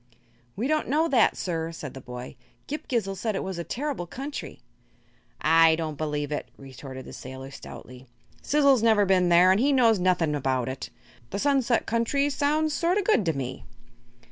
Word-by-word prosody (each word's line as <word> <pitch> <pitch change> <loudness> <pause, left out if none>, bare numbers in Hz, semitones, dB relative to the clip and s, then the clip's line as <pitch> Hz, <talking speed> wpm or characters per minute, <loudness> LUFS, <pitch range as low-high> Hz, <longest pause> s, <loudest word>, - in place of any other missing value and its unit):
"We 225 - -2
don't 310 +1 0
know 310 +4 +2
that, 245 -6 +3
sir," 165 -2 -3
said 155 -4 -8
the 135 - -9
boy. 125 +2 -8 0.3
"Ghip 300 - -6
Ghisizzle 205 -6 -1
said 210 +2 -2
it - - -2
was 190 -2 -5
a - - -2
terrible 250 - -4
country." 275 - -7 0.8
"I 165 0 +5
don't 160 -2 -4
believe 150 -1 -2
it," 150 - -4
retorted 130 -1 -10
the - - -10
sailor, 130 +1 -9
stoutly. 130 -1 -11 0.3
"Sizzle's 280 -4 +3
never 220 -3 +4
been 185 -2 +3
there, 175 +2 +6
an' 190 - +3
he 275 +4 +3
knows 230 -6 +4
nothing 180 -4 +2
about 130 -3 -1
it. 130 0 -5 0.4
'The 200 - -4
Sunset 260 -1 +1
Country' 255 +5 +1
sounds 300 +2 +1
sort 345 +4 +1
o' 410 - +1
good 385 - +3
to 165 - +1
me." 135 -3 -5
185 Hz, 180 wpm, -26 LUFS, -, 0.8 s, there